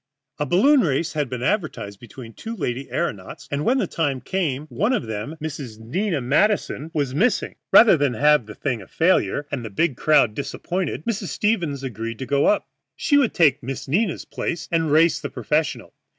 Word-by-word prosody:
A 150 - -1
balloon 265 - +5
race 155 - 0
had 150 -4 -1
been 125 -1 -4
advertised 155 - -2
between 120 0 -11
two 225 - -7
lady 135 - -3
aëronauts, 135 - -4
and 145 +1 -1
when 255 +8 +2
the 240 - +1
time 145 -6 -1
came 150 -5 -2
one 165 - 0
of 190 - -1
them, 110 +8 -5
Miss 145 -8 -6
Nina 160 - -2
Madison, 155 - +1
was 140 -5 -1
missing. 230 - +1 0.2
Rather 220 -4 +8
than 140 -5 0
have 150 -2 +3
the 110 - -9
thing 125 -6 -2
a 95 - -13
failure 160 - +1
and 130 -4 -3
a 110 - -5
big 135 +8 0
crowd 145 -8 +4
disappointed, 170 - -4
Mrs. 225 -4 -2
Stevens 170 -11 -1
agreed 115 -2 -5
to 130 - -5
go 140 +2 +2
up. 210 - +2 0.3
She 290 - +1
would 280 -5 +3
take 150 -5 +4
Miss 130 0 -6
Nina's 180 +7 0
place 165 -1 -4
and 165 -3 +1
race 160 +2 +4
the - - -5
professional. 150 -1 -2
150 Hz, 190 wpm, -22 LUFS, 125-175 Hz, 0.3 s, Rather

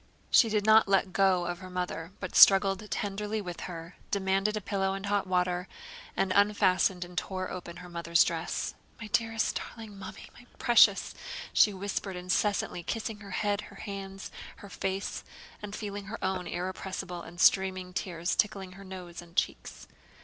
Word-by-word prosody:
She 230 - +6
did 210 -1 +1
not 220 0 +7
let 195 -1 +2
go 190 -3 +3
of 175 0 -3
her 185 -1 -9
mother 180 -2 -4
but 185 - -6
struggled 195 +1 +7
tenderly 210 +1 -2
with 180 -4 -6
her, 165 0 -8
demanded 195 +2 +1
a - - 0
pillow 195 -1 -1
and 195 +1 -5
hot 200 -1 0
water, 180 0 0 0.5
and 190 - +1
unfastened 190 -3 +3
and 175 0 -13
tore 185 +1 -3
open 175 -1 -7
her 180 0 -10
mother's 170 -1 +3
dress. - - -2 0.3
"My 230 - -6
dearest 225 0 +1
darling... 220 -3 -9
Mummy, 190 - -9
my 245 - -16
precious!..." 225 -4 +5 0.4
she 210 - +6
whispered 195 0 -4
incessantly, 180 +1 0
kissing 220 +3 -4
her 200 -1 -11
head, 205 +1 0
her 200 - -14
hands, 195 -1 -7 0.2
her 200 - -12
face, 195 0 -3 0.4
and 210 -1 -6
feeling 205 -2 -5
her 215 +4 -6
own 190 -1 -1
irrepressible 180 0 -4
and 175 +1 -11
streaming 185 -1 +3
tears 175 -2 -2
tickling 195 -3 0
her 195 +2 -12
nose 185 -2 -8
and 170 0 -16
cheeks. - - -2
195 Hz, 165 wpm, -30 LUFS, 180-205 Hz, 0.5 s, not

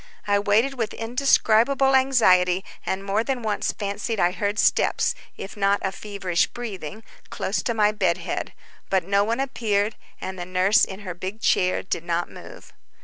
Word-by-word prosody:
I 205 0 +2
waited 225 +6 +1
with 225 - -2
indescribable 250 +2 +3
anxiety, 190 -9 +4 0.2
and 190 +1 -2
more 200 +3 0
than 255 -1 -2
once 210 -2 -1
fancied 205 +2 -3
I 175 - +3
heard 205 +2 -2
steps, - - +2 0.2
if 195 - -8
not 200 -1 +2
a 190 - 0
feverish 195 -4 -1
breathing 215 -4 -7 0.3
close 190 -1 -2
to 235 - -2
my 210 -1 +3
bed 190 -5 +1
head; - - -4 0.4
but 190 -2 +2
no 200 +3 +2
one 230 +4 -1
appeared, 220 -6 0 0.2
and 190 -1 -6
the 175 - -4
nurse 185 +3 +3
in 190 +2 -9
her 185 -3 -5
big 185 +5 -6
chair 185 -4 +2
did 170 - -3
not 170 0 -2
move. - - -12
205 Hz, 170 wpm, -24 LUFS, 190-225 Hz, 0.4 s, anxiety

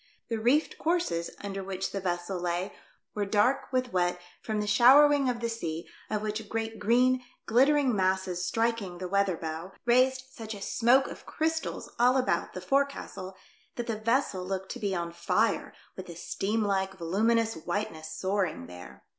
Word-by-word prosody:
The 230 -1 -1
reefed 255 +8 +2
courses 325 - 0
under 195 -1 -4
which 190 0 -3
the 200 - -3
vessel 175 0 -2
lay 175 +2 -2 0.4
were 210 - -1
dark 220 +7 +2
v/ith 255 -1 -1
wet 180 -1 +1 0.2
from 215 -1 -2
the 210 - -1
showering 270 +6 +6
of 240 -1 -2
the 235 - 0
sea, 170 -8 -4 0.2
of 210 0 -1
which 215 0 -4
great 225 0 -3
green, 250 +3 +3 0.2
glittering 265 +1 +4
masses 185 -2 0
striking 225 -1 -1
the 180 +1 -4
weather 200 -2 +1
bow, 160 +4 -6
raised 255 +2 +3
such 225 -4 -7
a - - -8
smoke 250 +3 +4
of - - -10
crystals 320 0 -2
all 250 +2 +5
about 255 - 0
the 185 - -5
forecastle 270 -6 -1 0.4
that 240 - -3
the 230 - -2
vessel 215 -3 0
looked 190 0 -4
to - - -6
be 200 -2 -1
on 170 -1 -3
fire 170 +5 0 0.2
with 185 - -8
the 170 - -8
steam 210 +6 -1
like, 195 -1 0
voluminous 220 +6 +1
white 180 +5 -3
ness 155 0 -9
soaring 190 - -1
there. 90 +1 -11
210 Hz, 170 wpm, -29 LUFS, 185-240 Hz, 0.4 s, showering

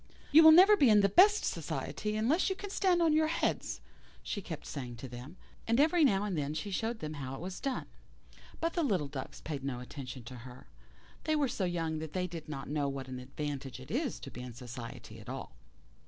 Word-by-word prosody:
"You 310 +2 +9
will 315 0 +10
never 375 +6 +9
be 280 - +5
in 210 -1 +7
the 200 - +4
best 410 - +6
society 210 0 -3
unless 255 - +2
you 380 - -1
can 400 +1 -7
stand 365 -4 +3
on 320 -2 +4
your 310 0 +4
heads," 320 - -1 0.4
she 205 - -3
kept 165 -4 -7
saying 125 -4 -6
to 120 +3 -8
them; 125 +8 -10 0.3
and 230 +3 +2
every 320 +3 +4
now 200 -8 +4
and 205 -3 -2
then 150 0 -2
she 200 +5 -4
showed 225 +4 -2
them 155 0 -4
how 135 -3 -5
it - - -8
was 180 +2 -6
done. 270 -2 -2 0.7
But 330 +1 -1
the 345 - 0
little 195 - +1
ducks 135 -2 -7
paid 145 -3 -5
no 135 -3 -3
attention 125 0 -8
to 125 +2 -9
her. 125 +1 -11 0.6
They 310 - +2
were 290 -2 +2
so 200 -6 -2
young 165 -3 -1
that 155 -1 -6
they 185 -1 0
did 165 -3 -7
not 135 -3 -5
know 145 -1 0
what 135 -1 -5
an 130 0 -5
advantage 135 -1 -5
it 130 - -10
is 265 +3 -1
to 135 - -8
be 125 - -8
in 125 -1 -7
society 120 -1 -8
at - - -11
all. - - -6
170 Hz, 230 wpm, -32 LUFS, -, 0.7 s, will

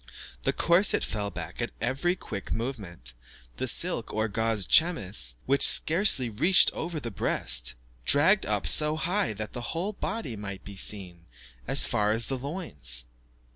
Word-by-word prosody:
The - - 0
corset 175 +4 +3
fell 105 -1 -3
back 85 +2 -7
at 120 - -4
every 135 +9 -1
quick 100 - -8
movement; 100 - -5 0.4
the - - -3
silk - - 0
or 110 +1 -1
gauze 110 -1 -1
chemise, 100 - +1
which 140 +1 +1
scarcely 160 - +6
reached 140 - +3
over 165 -1 -5
the 120 -5 -6
breast, - - +1 0.3
dragged 165 - +4
up - - -1
so 150 0 +4
high 180 - -1
that 105 0 -7
the 120 - -6 0.2
whole 195 +5 -3
body 195 - -5
might 100 -2 -8
be 100 - -10
seen 90 -4 -2 0.4
as - - +4
far 105 0 0
as 115 +1 0
the 135 - -3
loins. 75 - -4
115 Hz, 155 wpm, -27 LUFS, 100-160 Hz, 0.4 s, scarcely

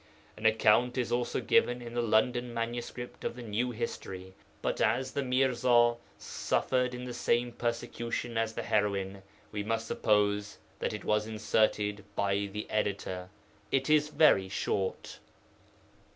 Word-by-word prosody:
An 110 +1 +1
account 110 +3 +4
is 125 -2 -1
also 120 0 0
given 125 - +3
in 120 -1 -8
the 120 - 0
London 120 +2 +2
manuscript 120 +1 -5
of - - -2
the 125 - -8
New 115 +3 -1
History, 95 -5 -5 0.3
but - - -1
as 130 +4 +1
the 140 - -1
Mirza 125 -2 +3 0.2
suffered 125 -1 0
in 125 - -6
the 125 - -5
same 120 0 +1
persecution 120 0 -3
as 115 0 0
the - - -3
heroine, 100 -2 0 0.3
we 105 - -3
must 115 +2 -1
suppose 105 -1 +1 0.2
that - - -1
it 105 - -6
was 105 0 +1
inserted 105 -1 +1
by 100 0 0
the 105 +1 -4
editor. 95 -3 -2 0.4
It 135 +2 +1
is 150 -1 +5
very 125 -12 +4
short. 95 0 -2
115 Hz, 145 wpm, -30 LUFS, 105-120 Hz, 0.4 s, is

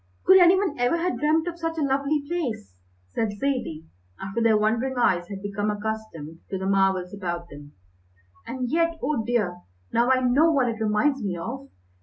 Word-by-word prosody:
"Could 380 +1 +8
any 355 +1 +7
one 375 -9 -1
ever 245 +7 +2
have 350 +1 -1
dreamt 315 +3 +2
of 345 0 -5
such 330 0 -3
a 310 - 0
lovely 280 +2 0
place?" 250 - -3 0.4
said 210 -2 -2
Zaidie, 245 - -2 0.3
after 195 +4 -3
their 225 -2 +4
wondering 230 +5 0
eyes 175 -7 +2
had 195 0 -8
become 205 +1 -2
accustomed 210 -7 -5
to 190 - -3
the 190 - -4
marvels 190 -2 +1
about 175 -3 -4
them, 145 0 -12 0.7
"and 255 0 -3
yet 335 0 +1
oh 265 -5 0
dear, 215 -7 0 0.4
now 235 +2 +3
I 260 0 +4
know 275 +6 +4
what 265 -5 +2
it 225 -1 -5
reminds 220 +6 +1
me 185 -3 -2
of! 265 +10 -6
235 Hz, 185 wpm, -25 LUFS, 195-285 Hz, 0.7 s, Could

